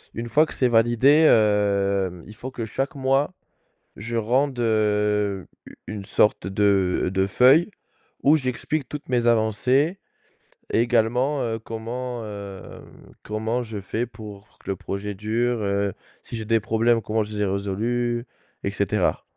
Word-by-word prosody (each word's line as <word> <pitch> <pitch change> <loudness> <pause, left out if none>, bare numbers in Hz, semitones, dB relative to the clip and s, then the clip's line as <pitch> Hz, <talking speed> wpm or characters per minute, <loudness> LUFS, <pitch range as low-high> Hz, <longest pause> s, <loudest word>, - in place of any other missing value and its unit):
Une 115 +1 -4
fois 155 +6 +4
que - - -9
c'est 130 - +2
validé, 120 +7 +5
heu, 100 -4 +2
il 105 - -11
faut 125 +5 -7
que 120 -3 -5
chaque 135 +6 -3
mois, 135 +5 +1 0.6
je 115 +3 -5
rende, 130 +4 +1
heu, 105 -3 +1 0.2
u - - -13
une 105 -2 -6
sorte 105 0 +2
de 95 -2 +2
de 95 0 +1
feuille 135 - +5 0.5
où 150 +3 +5
j'explique 130 +2 -3
toutes 150 -1 -7
mes 120 -1 +1
avancées 125 - +2 0.7
et - - +2
également, 125 +4 +1
heu, 115 -1 -2
comment, 120 +2 -5
heu, 100 -2 -8 0.4
comment 110 +3 -2
je 110 -3 -6
fais 110 +5 -2
pour 105 -1 -12
que - - -11
le - - -2
projet 100 +1 -5
dure, 115 +4 -1
heu, 100 -1 0 0.3
si - - -8
j'ai 110 - -5
des 115 +1 +2
problèmes, 115 +2 +2
comment 110 +1 0
je 105 - -9
les 105 - -3
ai - - +2
résolus, 115 +5 -1 0.4
et - - -1
cetera. - - 0
110 Hz, 155 wpm, -24 LUFS, 105-125 Hz, 0.7 s, validé